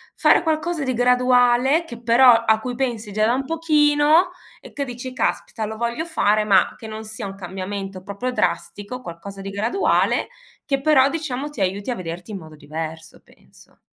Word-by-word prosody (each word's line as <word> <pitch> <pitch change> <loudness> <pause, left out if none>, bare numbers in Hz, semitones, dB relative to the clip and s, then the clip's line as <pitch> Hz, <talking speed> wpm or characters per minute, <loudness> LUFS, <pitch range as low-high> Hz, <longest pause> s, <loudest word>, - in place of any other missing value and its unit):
fare - - +4
qualcosa 320 0 -1
di 260 -1 -1
graduale, 250 +4 +3
che 235 -7 -9
però 240 +2 +5 0.2
a 220 -1 +4
cui 245 +2 -5
pensi 235 -5 -3
già 215 +1 +1
da 230 - +2
un 265 +2 -1
pochino 305 +2 +3 0.3
e - - -14
che 280 - -3
dici: 250 +1 -7
"Caspita 225 -3 -2
lo 220 +1 -6
voglio 235 +7 -2
fare." 215 -11 +2
Ma 200 -3 +3
che 225 - -11
non 220 0 -7
sia 220 0 -7
un 195 - -6
cambiamento 195 0 -6
proprio 200 +6 -4
drastico, 205 +2 -2
qualcosa 195 +1 -9
di 195 - -6
graduale, 220 - +1 0.4
che 275 -2 -1
però 275 -2 +4
diciamo 295 -3 -4
ti 295 - -11
aiuti 195 +4 -1
a 245 - -1
vederti 175 -1 -7
in 205 - -5
modo 155 -3 -12
diverso 160 +2 -7
penso. - - -22
235 Hz, 180 wpm, -22 LUFS, 200-270 Hz, 0.4 s, però